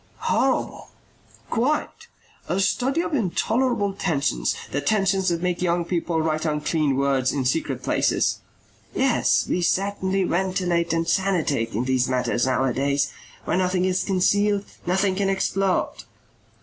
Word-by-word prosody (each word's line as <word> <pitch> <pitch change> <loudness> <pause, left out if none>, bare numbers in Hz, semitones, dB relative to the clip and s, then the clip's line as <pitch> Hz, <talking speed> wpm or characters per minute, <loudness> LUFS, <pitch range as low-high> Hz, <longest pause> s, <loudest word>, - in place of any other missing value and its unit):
"Horrible!" - - 0 0.6
"Quite. 280 +7 -1 0.4
A 180 - 0
study 260 - +1
of 345 - -4
intolerable 225 -1 0
tensions, 140 - -1 0.2
the 145 - -1
tensions 195 -2 +1
that 170 0 -2
make 180 -1 -1
young 175 -1 +1
people 170 -1 -1
write 155 -1 -1
unclean 150 -2 0
words 135 -1 +1
in 135 -3 -2
secret 130 -2 -1
places." - - +1 0.6
"Yes, - - +2
we 180 - 0
certainly 195 +1 0
ventilate 180 -2 0
and 165 0 0
sanitate 165 - 0
in 115 - 0
those 130 -1 +1
matters 125 -1 0
nowadays. 135 +2 +1 0.3
Where - - 0
nothing 185 0 +1
is 185 0 +1
concealed, 205 +1 +1 0.2
nothing 190 +2 +2
can 195 +1 0
explode." 195 0 0
180 Hz, 130 wpm, -23 LUFS, 140-195 Hz, 0.6 s, Yes